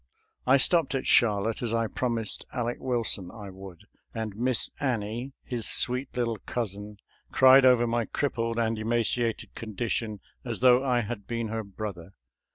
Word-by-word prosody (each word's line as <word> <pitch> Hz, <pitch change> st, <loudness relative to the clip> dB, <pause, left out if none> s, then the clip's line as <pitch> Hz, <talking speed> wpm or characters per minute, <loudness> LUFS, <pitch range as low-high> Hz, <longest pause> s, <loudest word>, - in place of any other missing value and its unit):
♦ -, -, -41 dB, 0.3 s
» -, -, -48 dB
* -, -, -38 dB
I 135 Hz, -, +8 dB
stopped 160 Hz, 0 st, +3 dB
at 135 Hz, -, -2 dB
Charlotte, 110 Hz, -1 st, +3 dB
as 115 Hz, -2 st, -1 dB
I 115 Hz, 0 st, +1 dB
promised 115 Hz, -1 st, -1 dB
Aleck 120 Hz, -1 st, -2 dB
Wilson 115 Hz, -7 st, -1 dB
I 100 Hz, -1 st, -9 dB
would, 95 Hz, -2 st, -11 dB, 0.3 s
and 110 Hz, -3 st, -4 dB
Miss 125 Hz, +2 st, 0 dB
Annie, 120 Hz, 0 st, -2 dB
his 120 Hz, -4 st, -2 dB
sweet 125 Hz, +2 st, +1 dB
little 115 Hz, -3 st, -1 dB
cousin, 105 Hz, -3 st, -4 dB, 0.3 s
cried 130 Hz, 0 st, +7 dB
over 125 Hz, -2 st, +5 dB
my 115 Hz, 0 st, 0 dB
crippled 115 Hz, -4 st, -2 dB
and 115 Hz, -1 st, 0 dB
emaciated 115 Hz, +1 st, -1 dB
condition 110 Hz, -1 st, -3 dB, 0.2 s
as 120 Hz, -3 st, -4 dB
though 125 Hz, 0 st, +6 dB
I 125 Hz, -3 st, +2 dB
had 105 Hz, -2 st, -6 dB
been 115 Hz, -2 st, -3 dB
her 110 Hz, 0 st, -3 dB
brother. 100 Hz, -3 st, -7 dB
115 Hz, 165 wpm, -27 LUFS, 105-125 Hz, 0.3 s, I